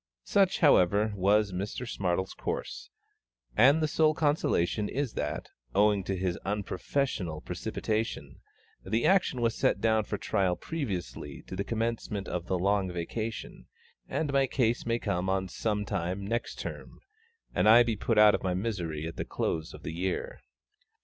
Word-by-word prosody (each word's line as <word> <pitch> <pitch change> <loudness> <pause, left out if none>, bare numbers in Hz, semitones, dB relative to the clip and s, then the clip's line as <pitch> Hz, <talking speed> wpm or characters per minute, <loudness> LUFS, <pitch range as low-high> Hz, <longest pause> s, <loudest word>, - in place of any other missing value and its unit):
Such, 195 -1 +2
however, 105 - +4
was 100 +2 +3
Mr 100 +7 -4
SMARTLE'S 95 -2 -1
course; - - -5 0.7
and 140 +7 +6
the - - +3
sole 155 0 +3
consolation 110 - +1
is 140 -2 -2
that, - - -3 0.3
owing 105 -1 +4
to 95 -1 -2
his 90 -1 -1
unprofessional 100 - -2
precipitation, 110 +1 -3 0.4
the 115 +2 0
action 180 -9 +3
was 115 -1 +2
set - - +1
down 110 -1 +2
for 105 - -3
trial 95 -3 +1
previously 100 - -5
to - - -7
the 100 - -1
commencement 115 -2 -2
of 90 -1 -4
the 95 - 0
Long 95 0 +1
Vacation, 110 +6 -5 0.4
and 150 -3 -1
my 135 -1 +3
case 120 -3 0
may 115 0 +2
come 90 -4 -1
on 95 0 0
some 105 +2 -2
time 95 +2 -2
next 115 +3 -2
Term, - - -7 0.5
and 105 - +3
I 120 +2 +9
be 115 -2 -1
put 110 +2 -1
out 105 -1 +8
of - - 0
my 90 -1 -1
misery 90 -7 -3
at 80 - -6
the - - -1
close 80 -1 -2
of - - -12
the 80 - -4
year. 90 +2 -3
105 Hz, 160 wpm, -29 LUFS, 95-115 Hz, 0.7 s, I